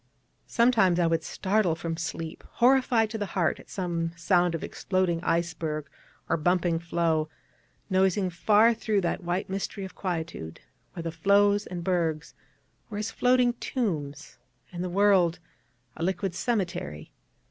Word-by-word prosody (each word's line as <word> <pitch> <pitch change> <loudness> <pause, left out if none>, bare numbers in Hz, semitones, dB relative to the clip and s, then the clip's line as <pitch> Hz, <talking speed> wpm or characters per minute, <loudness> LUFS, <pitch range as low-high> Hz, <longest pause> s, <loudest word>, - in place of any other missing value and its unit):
Sometimes 225 -7 +3
I 175 - +3
would 165 -1 +1
startle 190 -2 0
from 165 0 -4
sleep, 165 -1 -5
horrified 245 -3 +3
to 220 - -4
the 205 - -2
heart 170 -4 +1
at - - -15
some 170 -3 -2
sound 175 0 +2
of 165 - -5
exploding 185 -3 -1
iceberg, 165 -3 -1 0.4
or - - +1
bumping 175 +1 +1
floe, 165 -2 0 0.6
noising 190 -1 +2
far 215 +6 +4
through 215 -2 0
that 175 +1 -2
white 175 +2 -2
mystery 195 +1 -4
of 190 - -10
quietude, 160 - -4 0.3
where 170 - -6
the 165 - -3
floes 200 +4 +3
and 175 -1 -5
bergs 165 -4 -1 0.6
were 205 - -5
as 215 +1 -3
floating 250 -1 +3
tombs, 155 - -3 0.3
and 175 -1 -4
the 180 - -3
world 185 -3 +3 0.6
a - - -9
liquid 190 +1 -1
cemetery. 180 - -3
180 Hz, 145 wpm, -27 LUFS, 165-205 Hz, 0.6 s, far